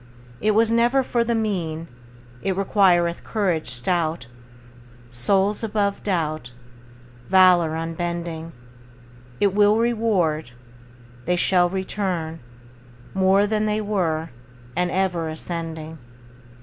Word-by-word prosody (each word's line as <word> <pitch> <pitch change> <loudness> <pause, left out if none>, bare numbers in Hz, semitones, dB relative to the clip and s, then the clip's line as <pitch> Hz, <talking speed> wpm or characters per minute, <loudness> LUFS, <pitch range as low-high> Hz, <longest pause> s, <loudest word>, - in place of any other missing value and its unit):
It 215 0 +2
was 225 +1 +3
never 240 +3 +3
for 240 -2 0
the 235 0 0
mean; 170 -7 -2 0.5
It 190 -1 -1
requireth 180 -4 +2
courage 185 -7 -1
stout. 160 +3 -1 0.9
Souls 195 - +1
above 205 -2 -1
doubt, 155 - -2 0.8
Valor 180 -4 +5
unbending, 165 0 -4 0.9
It 200 -2 +2
will 205 +1 +4
reward, 205 - 0 0.7
They 180 - +1
shall 175 0 +3
return 185 -4 -3 0.7
More 190 +1 +3
than 215 0 0
they 210 0 0
were, 170 -7 -1 0.4
And 180 0 +1
ever 175 -3 -1
ascending. 160 -1 -6
180 Hz, 100 wpm, -23 LUFS, 165-205 Hz, 0.9 s, Valor